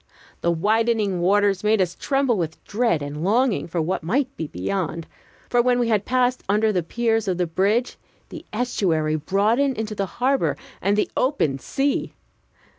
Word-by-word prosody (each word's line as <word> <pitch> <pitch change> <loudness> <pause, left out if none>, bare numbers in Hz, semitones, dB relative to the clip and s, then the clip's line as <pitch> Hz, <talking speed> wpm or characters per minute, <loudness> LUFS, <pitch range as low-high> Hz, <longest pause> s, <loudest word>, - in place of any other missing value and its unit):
The 170 - +1
widening 210 +2 +1
waters 200 +1 +2
made 215 0 +3
us 180 -2 +1
tremble 270 -1 0
with 165 -4 -4
dread 210 -8 0
and 145 +2 -5
longing 230 +4 +1
for 170 0 -3
what 175 +4 -1
might 260 - -1
be 160 - -4
beyond; 165 - -3 0.4
for 245 - +3
when 250 0 +2
we 240 -1 +1
had 215 -3 +1
passed 250 0 +1
under 215 +2 +3
the 185 -3 +1
piers 225 +4 0
of 185 -2 0
the 180 - +1
bridge, 200 +9 0 0.3
the 325 - -9
estuary 175 -10 0
broadened 215 - +1
into 220 -1 -3
the 200 -2 -2
harbor 265 +2 +1 0.2
and 200 +1 +1
the 210 - 0
open 205 - +1
sea. 275 - -1
210 Hz, 170 wpm, -23 LUFS, 175-240 Hz, 0.4 s, made